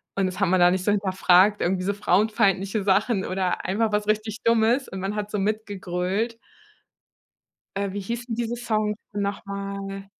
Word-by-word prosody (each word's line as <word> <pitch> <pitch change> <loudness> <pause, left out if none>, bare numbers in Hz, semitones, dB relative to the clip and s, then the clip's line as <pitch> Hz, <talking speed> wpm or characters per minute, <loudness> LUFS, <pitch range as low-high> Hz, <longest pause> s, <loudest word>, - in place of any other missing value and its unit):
und 195 - +1
das 185 +1 -4
hat 195 - +3
man 185 +1 +3
da 175 0 +6
nicht 185 0 -1
so 205 - +2
hinterfragt, 195 0 +3
irgendwie 185 +1 0
so 200 +2 0
frauenfeindliche 200 0 +1
Sachen 195 +1 +2
oder 185 -1 -2
einfach 215 +4 0
was 210 0 0
richtig 215 +1 -1
Dummes 230 +3 +3
und 190 - -7
man 195 +2 -3
hat 210 -1 -3
so - - -1
mit 215 +2 -1
gegrölt. 195 +4 -2 1.4
Äh, 200 -1 -1
wie 205 - -4
hießen 235 +3 -4
diese 235 +1 -2
Songs 215 -3 -1 0.2
nochmal? 200 -1 -4
200 Hz, 170 wpm, -24 LUFS, 190-215 Hz, 1.4 s, da